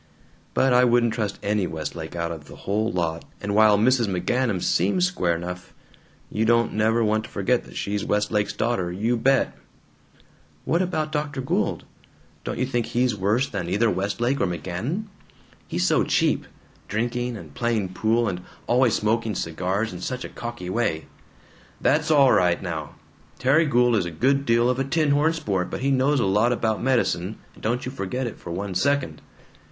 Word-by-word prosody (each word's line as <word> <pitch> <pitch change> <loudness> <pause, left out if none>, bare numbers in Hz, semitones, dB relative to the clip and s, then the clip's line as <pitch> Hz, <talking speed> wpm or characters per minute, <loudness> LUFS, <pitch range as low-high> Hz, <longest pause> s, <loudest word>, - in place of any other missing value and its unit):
But 130 -1 +3
I 125 0 +6
wouldn't 120 -2 +3
trust 105 -4 -2
any 100 -2 +1
Westlake 80 +1 -6
out 85 0 -2
of 80 -3 -7
the - - -12
whole 110 +3 -1
lot, 85 -2 -2 0.2
and 100 - -3
while 105 -1 +6
Mrs. 120 +1 +3
McGanum 100 +3 0
SEEMS 100 - +2
square 90 - 0
enough, 90 +2 -7 0.6
you 110 - 0
don't 115 +1 +3
never 110 +2 +2
want 110 0 +1
to - - -12
forget 120 +5 0
that - - -14
she's 100 0 -2
Westlake's 105 0 0
daughter. 110 -6 -1
You 110 +7 0
bet!" 135 +3 +2 1.1
"What 170 - +2
about 160 -4 -1
Dr. 150 -2 -2
Gould? 130 - -1 0.6
Don't - - -4
you 130 - +1
think 120 -3 -1
he's 120 0 +1
worse 105 +7 +1
than 85 -8 -4
either 105 +4 +2
Westlake 115 +8 -1
or - - +2
McGanum? 90 - -3 0.6
He's - - -1
so - - +3
cheap - - +1 0.4
drinking, 120 +2 -2
and 80 -7 -11
playing 115 -3 -1
pool, 115 +4 +1
and 90 -3 -3 0.2
always 120 -1 +3
smoking 110 0 0
cigars 95 +6 -2
in 90 - -8
such 125 +5 -4
a - - -7
cocky 120 -7 -6
way 95 -8 -1 0.4
" - - -28
"That's 155 +2 +2
all 140 -4 +6
right 90 -1 +3
now! 80 -5 -5 0.4
Terry 145 +5 +3
Gould 120 -3 +3
is 95 -5 +1
a - - -3
good 135 - +1
deal 115 +1 +4
of 125 +1 0
a - - +2
tin 150 +2 +1
horn 150 +3 +3
sport, 100 - -2
but - - -5
he 140 +1 +1
knows 135 +2 +2
a 120 - +2
lot 105 +5 +3
about 110 -3 0
medicine, 115 -6 0 0.2
and - - -18
don't 120 +3 -1
you 130 - -4
forget 125 +1 -3
it 115 - -6
for - - -9
one 95 +3 -4
second!" 140 +8 0
115 Hz, 185 wpm, -24 LUFS, 95-125 Hz, 1.1 s, I